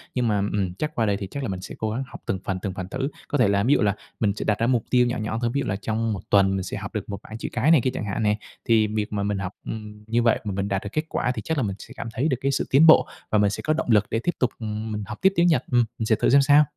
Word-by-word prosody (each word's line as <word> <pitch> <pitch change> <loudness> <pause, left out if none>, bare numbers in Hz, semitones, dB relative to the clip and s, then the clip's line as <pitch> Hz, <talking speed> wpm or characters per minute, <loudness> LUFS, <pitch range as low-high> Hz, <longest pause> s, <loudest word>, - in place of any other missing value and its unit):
Nhưng 125 -2 +1
mà, 105 -2 +2 0.2
ừm, 95 -3 -1
chắc 155 - -4
qua 115 - +1
đây 100 -2 +1
thì 100 - -5
chắc 140 -1 -4
là 115 - -2
mình 95 -1 -4
sẽ 95 - -8
cố 110 - -2
gắng 125 +5 -2
học - - -11
từng 95 - -1
phần, 95 -1 -2
từng 100 -2 -3
phần 95 -1 -5
thử. 130 +5 -2 0.2
Có 145 - 0
thể 125 - +4
là 100 0 +2
ví 130 +6 +4
dụ - - +3
là 100 -1 +2 0.2
mình 105 -3 +2
sẽ - - -4
đặt 105 -1 +1
ra 115 - +2
mục 120 -3 +2
tiêu 125 -1 +4
nhỏ 120 - -2
nhỏ 110 +1 -2
thôi, 120 -1 0
ví 140 - 0
dụ - - -3
là 95 - 0
trong 110 +2 -1
1 95 - -5
tuần 95 -1 +4
mình 95 - -2
sẽ 90 - -5
học 100 +2 -7
được 105 -1 -4
1 100 -2 -4
bảng 110 - -8
chữ - - -5
cái 125 +6 +2
này 160 -7 +6
kia 130 - +1
chẳng - - -4
hạn 100 +2 -2
nè. 105 0 +2 0.3
Thì 110 -2 +4
việc 105 0 -3
mà 100 -1 -1
mình 100 -1 -1
học, 95 0 -4
ừm, 105 -1 -7
như 115 +2 +1
vậy 115 - +3
mà 105 - -3
mình 95 +1 -2
đạt 100 -1 -1
được 105 - -5
kết 155 - 0
quả 125 - 0
thì - - -3
chắc 160 - -2
là 135 - +1
mình 100 -3 -2
sẽ - - -11
cảm 115 - -5
thấy 130 +7 0
được 130 -6 +1
cái 140 - +1
sự - - 0
tiến 150 +5 +6
bộ. 160 - +7 0.2
Và 110 - +2
mình 100 -1 +4
sẽ 105 - -4
có 155 - +1
động 160 - -2
lực 105 -2 +5
để 115 - 0
tiếp 175 - +2
tục, 125 - +2
ừm, 110 0 -4
mình 105 -1 -3
học - - -6
tiếp 190 0 +4
tiếng 170 -1 +4
Nhật. 165 - +3
Ừm, 120 -1 +4
mình 110 - -2
sẽ 110 - +3
thử - - +1
xem 140 +2 +6
sao. 145 +2 +6
110 Hz, 360 wpm, -24 LUFS, 100-125 Hz, 0.3 s, bộ